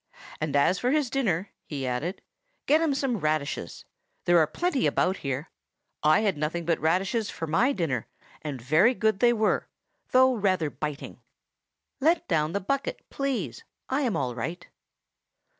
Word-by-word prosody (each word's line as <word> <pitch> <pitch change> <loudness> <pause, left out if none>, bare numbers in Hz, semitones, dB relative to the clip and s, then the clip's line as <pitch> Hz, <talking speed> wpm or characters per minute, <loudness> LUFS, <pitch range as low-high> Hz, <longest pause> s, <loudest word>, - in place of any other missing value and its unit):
And 155 -2 -2
as 180 +6 +3
for 245 - +1
his 285 -3 +1
dinner," 200 -9 0 0.2
he 140 -3 -4
added, 130 +10 -3 0.4
"get 305 +3 +4
him 310 -4 +1
some 265 -4 0
radishes. 150 - -2 0.4
There 175 0 +5
are 155 - +4
plenty 335 - 0
about 190 +1 +1
here. 135 +2 -4 0.5
I 155 +5 +4
had 200 -8 0
nothing 160 +3 -2
but 165 0 +1
radishes 190 +7 +1
for 165 - -4
my 165 - +2
dinner, 160 - -2 0.3
and 145 -4 -5
very 155 - +4
good 220 -4 +1
they 240 +1 +5
were, 220 -2 +1 0.4
though 260 0 +5
rather 185 -9 +1
biting. 150 0 -6 0.8
Let 325 +5 +2
down 155 -2 +1
the 200 - 0
bucket, 275 +8 -2
please! 275 -2 -2 0.3
I 265 +3 +1
am 245 -6 0
all 125 -3 -1
right." 165 +9 -5
180 Hz, 160 wpm, -27 LUFS, 155-245 Hz, 0.8 s, There